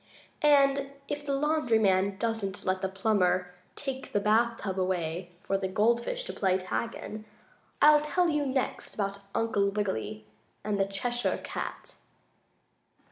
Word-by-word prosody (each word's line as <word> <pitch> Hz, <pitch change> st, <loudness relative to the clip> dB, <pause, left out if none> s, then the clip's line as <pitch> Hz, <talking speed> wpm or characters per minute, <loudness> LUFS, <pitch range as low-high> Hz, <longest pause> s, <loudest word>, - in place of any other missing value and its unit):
And 275 Hz, -1 st, +4 dB
if 290 Hz, 0 st, -3 dB
the 280 Hz, -1 st, -1 dB
laundry 295 Hz, -5 st, +2 dB
man 195 Hz, -2 st, +2 dB
doesn't 220 Hz, -3 st, -2 dB
let 185 Hz, 0 st, 0 dB
the 190 Hz, -, -1 dB
plumber 185 Hz, -3 st, +1 dB, 0.2 s
take 270 Hz, -2 st, -5 dB
the 205 Hz, -, +3 dB
bath 225 Hz, +3 st, +2 dB
tub 190 Hz, -2 st, -3 dB
away 175 Hz, -1 st, -1 dB
for 195 Hz, 0 st, 0 dB
the 190 Hz, -, -1 dB
gold 230 Hz, +5 st, +2 dB
fish -, -, -1 dB
to -, -, -4 dB
play 190 Hz, -2 st, +2 dB
tag 190 Hz, +5 st, -3 dB
in, 215 Hz, 0 st, -7 dB, 0.6 s
I'll 300 Hz, 0 st, +8 dB
tell 350 Hz, +4 st, +1 dB
you 300 Hz, -3 st, +1 dB
next 265 Hz, -1 st, -2 dB
about 200 Hz, -1 st, -2 dB, 0.2 s
Uncle 205 Hz, -3 st, +2 dB
Wiggily 210 Hz, +1 st, -3 dB, 0.4 s
and 210 Hz, -1 st, -1 dB
the 195 Hz, -, +3 dB
Cheshire 240 Hz, +5 st, -1 dB
Cat. -, -, -5 dB
215 Hz, 150 wpm, -29 LUFS, 190-270 Hz, 0.6 s, I'll